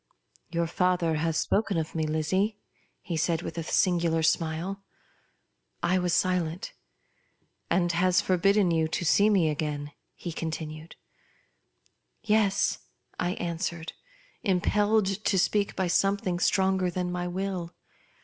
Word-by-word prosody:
" - - -33
Your 170 0 0
father 175 -1 +1
has 160 +1 0
spoken 200 -3 +1
of 160 -1 -2
me, 160 -1 -1
Lizzie 185 +7 0 0.2
?" - - -41
he 170 - 0
said 165 +1 0
with - - -6
a 170 - -2
singular 170 -1 +2
smile. 165 +4 0 1.0
I 185 +2 +2
was 180 -1 0
silent. 180 -1 0 0.5
" - - -44
And 175 0 +2
has 180 +1 +3
forbidden 195 +1 +3
you 160 -1 +2
to 170 +2 -3
see 200 +6 +4
me 190 -6 +3
again 150 -1 -3
?" - - -50
he 175 - -6
continued. 160 0 -6 0.7
" - - -49 0.5
Yes," 210 -3 +2 0.4
I 175 +1 0
answered, 170 -1 -4 0.5
impelled 205 +2 +2 0.2
to 195 - +2
speak 200 +2 +1
by 190 - 0
something 185 0 +1
stronger 190 -1 +2
than 180 0 -2
my 180 0 -2
will. 180 -1 -4
175 Hz, 140 wpm, -27 LUFS, 160-190 Hz, 1.0 s, see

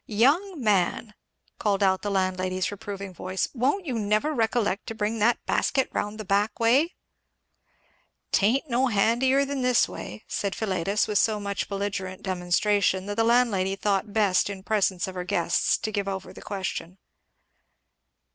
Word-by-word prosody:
"Young 295 - +2
man!" 210 -1 +1 0.5
called 205 -1 +1
out 190 -1 +3
the 205 - -3
landlady's 185 -1 -1
reproving 200 -1 -7
voice, 185 +1 -2
"won't 280 - 0
you 250 -6 -2
never 215 +9 +1
recollect 225 -4 0
to 225 - -5
bring 220 +1 -2
that 235 +3 +2
basket 265 -2 +1
round 210 +1 -3
the 215 - -5
back 200 +3 0
way?" 265 +9 +3 1.4
"'Tain't 240 +9 +2
no 255 +1 +2
handier 245 +5 +2
than 280 -1 -3
this 250 -1 +3
way," 215 - -8
said 200 -1 -2
Philetus, 200 -1 0
with 210 -2 +2
so 215 -2 +2
much 200 -1 -3
belligerent 195 -2 -4
demonstration 190 +1 +1
that 205 0 -4
the 225 - +2
landlady 225 -5 +2
thought 200 +1 -1
best 200 -3 +2
in 195 -2 -7
presence 195 -4 +1
of 190 - -6
her 180 -1 -4
guests 175 -1 +1
to 215 - -4
give 200 -2 -2
over 190 -1 -5
the - - -12
question. 190 -2 -5
205 Hz, 155 wpm, -26 LUFS, 190-230 Hz, 1.4 s, out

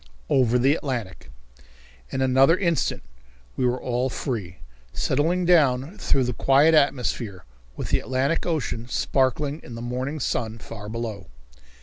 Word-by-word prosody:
Over 125 -2 +3
the 135 +3 +4
Atlantic. 120 - -4 0.8
In 130 - -3
another 130 +5 +4
instant 170 - 0 0.5
we 125 - +1
were 125 +1 0
all 125 +1 -1
free, 105 - -4 0.3
settling 165 - 0
down 155 +1 +3
through 135 - +2
the 125 0 -1
quiet 140 +7 +4
atmosphere 125 - +1 0.3
with - - -4
the - - +2
Atlantic 135 +5 0
Ocean 120 -8 -2
sparkling 140 +4 0
in 120 - -10
the - - -7
morning 130 +5 -3
sun 115 -3 -2
far 105 -1 -9
below. 110 -5 -5
130 Hz, 135 wpm, -24 LUFS, 120-145 Hz, 0.8 s, the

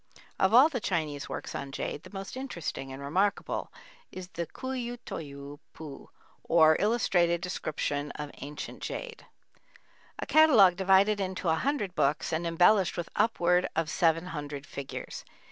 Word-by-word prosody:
Of 190 - +3
all 255 +6 +8
the 285 -6 -3
Chinese 155 -8 -2
works - - -5
on 140 0 -5
jade 145 - -4
the - - -13
most 195 +2 -7
interesting 170 - -5
and 135 - -7
remarkable 190 +8 -1 0.4
is 185 -1 -8
the 170 -2 -4
Ku 260 - -7
yü 245 -2 -3
t'ou 140 -1 -7
pu 150 -4 -10 0.3
or 160 -1 +5
"Illustrated 180 -6 +2
Description 150 -5 -3
of 150 -1 -6
Ancient 145 +1 -7
Jade," - - -6 0.9
a - - -4
catalogue 255 - +6
divided 195 +2 +4
into 185 -2 -2
a - - +4
hundred 210 - -1
books 150 +1 0
and 170 +2 -1
embellished 180 +4 +4
with 175 - -4
upward 180 -5 +2
of 160 -1 0
seven 165 0 +2
hundred 145 -2 -6
figures. 140 -1 -7
175 Hz, 150 wpm, -29 LUFS, 150-205 Hz, 0.9 s, all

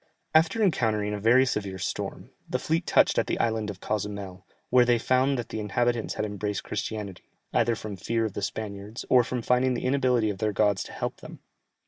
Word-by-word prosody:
After 160 +8 +4
encountering 110 - +1
a 105 - -3
very 120 +5 +5
severe 100 -6 -2
storm, 95 - -4 0.2
the - - 0
fleet 165 +2 -1
touched - - +4
at - - 0
the - - -1
island 110 -2 0
of 100 -2 -7
Cozumel, 100 -3 -4 0.2
where 125 0 +7
they 120 0 +3
found 130 +3 +2
that 120 - -4
the - - -4
inhabitants 120 +3 0
had 105 - -1
embraced 105 -1 -3
Christianity, 105 -4 -5 0.2
either 115 0 +2
from 105 -2 -6
fear 115 +4 -1
of 105 - -4
the - - -4
Spaniards, 100 +2 -5
or 125 -1 +7
from 120 0 -3
finding 125 +1 +2
the 120 - -3
inability 125 -5 +2
of 95 - -8
their 105 0 0
gods 100 -2 +2
to - - -10
help - - -4
them. - - -10
110 Hz, 200 wpm, -27 LUFS, 105-125 Hz, 0.2 s, where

